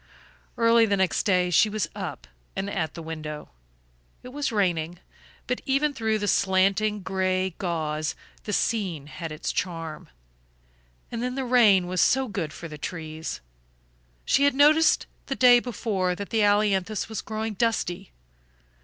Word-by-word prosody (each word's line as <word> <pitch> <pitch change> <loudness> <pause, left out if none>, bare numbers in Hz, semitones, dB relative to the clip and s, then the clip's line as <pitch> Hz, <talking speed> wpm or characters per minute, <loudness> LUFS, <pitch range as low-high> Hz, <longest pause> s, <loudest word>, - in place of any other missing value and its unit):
Early 230 -1 +5
the 200 -1 +1
next 190 +3 +1
day 180 -2 +2
she 215 +5 +5
was 210 -1 -2
up - - -6 0.3
and 195 +1 -3
at 160 -6 -2
the 165 - -7
window. 155 -2 -6 0.7
It 250 - -9
was 285 0 -2
raining, 175 -5 0 0.5
but 250 - -2
even 285 +2 +1
through 220 -4 0
the 205 -1 -3
slanting 195 +2 +2
gray 185 0 0
gauze 155 -4 -2 0.3
the 210 - -3
scene 195 -9 -1
had 160 +2 -7
its 155 +3 -3
charm 165 -4 -4 1.0
and 235 - -4
then 250 +1 -2
the 270 -1 -2
rain 220 -7 +5
was 180 -1 0
so 265 0 +3
good 175 -8 -4
for 165 - -8
the 150 -2 -10
trees. 160 - -6 0.8
She 280 +2 +3
had 285 - +3
noticed 305 +3 +5 0.2
the 270 - -2
day 245 -2 +7
before 205 -7 -2
that 200 +2 -7
the 225 -2 +2
ailanthus 205 -1 +2
was 220 -1 -4
growing 220 0 -4
dusty. 195 -4 -1
200 Hz, 155 wpm, -25 LUFS, 175-230 Hz, 1.0 s, day